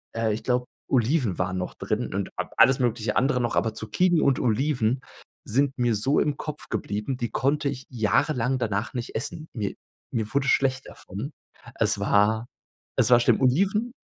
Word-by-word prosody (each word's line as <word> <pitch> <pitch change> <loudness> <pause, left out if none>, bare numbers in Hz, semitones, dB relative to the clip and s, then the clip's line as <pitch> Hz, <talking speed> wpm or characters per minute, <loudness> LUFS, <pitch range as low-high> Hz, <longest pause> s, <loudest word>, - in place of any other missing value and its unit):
äh, 115 -2 +1
ich 110 - -5
glaube, 125 -1 +1 0.2
Oliven 125 - +1
waren 90 0 -1
noch 90 - -4
drin - - -3
und - - -2
a - - -3
alles 135 0 +6
mögliche 115 -3 0
andere 125 -1 +2
noch. 120 - -1
Aber 110 -1 +1
Zucchini 165 - +1
und 135 -2 +3
Oliven 125 0 +1 0.4
sind 135 +4 +1
mir 120 -3 +2
so 135 +8 +2
im 150 -2 +1
Kopf 150 -1 -6
geblieben, 105 +6 -2
die 120 -3 -2
konnte 140 +4 0
ich 135 -1 -6
jahrelang 125 +2 +1
danach 105 0 -2
nicht 120 -2 -5
essen. 155 +7 -4
Mir 105 -5 -3 0.4
mir 110 -2 -2
wurde 140 0 +1
schlecht 135 0 +2
davon. 105 - -7 0.4
Es - - +1
war 110 +3 +2 0.5
es - - +3
war 120 - +8
schlimm. - - +3
Oliven 195 - +2
125 Hz, 175 wpm, -25 LUFS, 110-140 Hz, 0.5 s, war